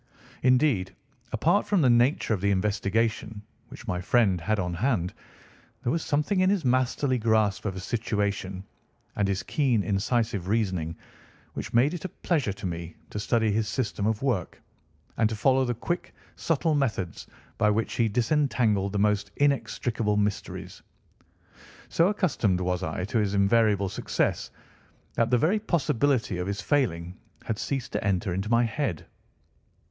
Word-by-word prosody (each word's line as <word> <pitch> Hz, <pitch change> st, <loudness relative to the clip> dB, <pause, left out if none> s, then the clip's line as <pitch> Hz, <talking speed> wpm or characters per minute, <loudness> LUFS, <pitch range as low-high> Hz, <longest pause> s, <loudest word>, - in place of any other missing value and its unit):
Indeed, 125 Hz, -8 st, +2 dB, 0.4 s
apart 165 Hz, -, +2 dB
from 195 Hz, -6 st, +2 dB
the 130 Hz, -, +5 dB
nature 120 Hz, 0 st, +3 dB
of 100 Hz, -, -2 dB
the 100 Hz, -, +2 dB
investigation 105 Hz, +2 st, 0 dB, 0.3 s
which -, -, -12 dB
my 90 Hz, 0 st, -1 dB
friend 95 Hz, -3 st, +2 dB
had 110 Hz, +6 st, 0 dB
on 90 Hz, -2 st, -2 dB
hand, 95 Hz, -3 st, 0 dB, 0.7 s
there 120 Hz, -, +1 dB
was 165 Hz, 0 st, -1 dB
something 150 Hz, +6 st, 0 dB
in 185 Hz, 0 st, +4 dB
his 195 Hz, -7 st, +1 dB
masterly 130 Hz, +1 st, +1 dB
grasp 110 Hz, -3 st, +1 dB
of 95 Hz, -2 st, -2 dB
a -, -, -5 dB
situation, 100 Hz, -3 st, -2 dB, 0.5 s
and 100 Hz, -1 st, +1 dB
his 95 Hz, -1 st, -1 dB
keen, 125 Hz, -1 st, +1 dB
incisive 100 Hz, 0 st, 0 dB
reasoning, 95 Hz, -7 st, 0 dB, 0.6 s
which -, -, -5 dB
made 135 Hz, +7 st, +4 dB
it 175 Hz, -, -5 dB
a 185 Hz, -, -3 dB
pleasure 155 Hz, -, -1 dB
to 95 Hz, -, -8 dB
me 85 Hz, -2 st, -5 dB, 0.2 s
to 105 Hz, -, -4 dB
study 110 Hz, +1 st, +1 dB
his 110 Hz, +1 st, 0 dB
system 105 Hz, -3 st, -2 dB
of 110 Hz, +2 st, -1 dB
work, 115 Hz, -11 st, -1 dB, 0.6 s
and 110 Hz, -2 st, +3 dB
to 110 Hz, -, -3 dB
follow 130 Hz, +4 st, +3 dB
the 120 Hz, -1 st, -1 dB
quick, 175 Hz, +10 st, -4 dB, 0.2 s
subtle 165 Hz, 0 st, 0 dB
methods 110 Hz, -, -2 dB, 0.3 s
by 105 Hz, -, +4 dB
which 105 Hz, 0 st, 0 dB
he 115 Hz, -2 st, +1 dB
disentangled 115 Hz, -5 st, +1 dB
the -, -, 0 dB
most 105 Hz, 0 st, +1 dB
inextricable 120 Hz, -6 st, 0 dB
mysteries. 105 Hz, -1 st, -3 dB, 1.1 s
So 170 Hz, -, +3 dB
accustomed 155 Hz, -, +1 dB
was 90 Hz, 0 st, -1 dB
I 90 Hz, 0 st, -3 dB
to 110 Hz, +3 st, 0 dB
his 105 Hz, -1 st, 0 dB
invariable 100 Hz, 0 st, +3 dB
success -, -, -1 dB, 0.6 s
that 115 Hz, 0 st, +1 dB
the 125 Hz, -, +4 dB
very 180 Hz, -, +2 dB
possibility 145 Hz, -, 0 dB
of 90 Hz, -, -3 dB
his 100 Hz, 0 st, -3 dB
failing 95 Hz, -, -1 dB, 0.3 s
had 110 Hz, -2 st, -2 dB
ceased 135 Hz, -3 st, -3 dB
to -, -, -2 dB
enter 95 Hz, -1 st, 0 dB
into 95 Hz, +4 st, -3 dB
my 115 Hz, +1 st, +4 dB
head. 115 Hz, -, -2 dB
110 Hz, 160 wpm, -27 LUFS, 100-130 Hz, 1.1 s, the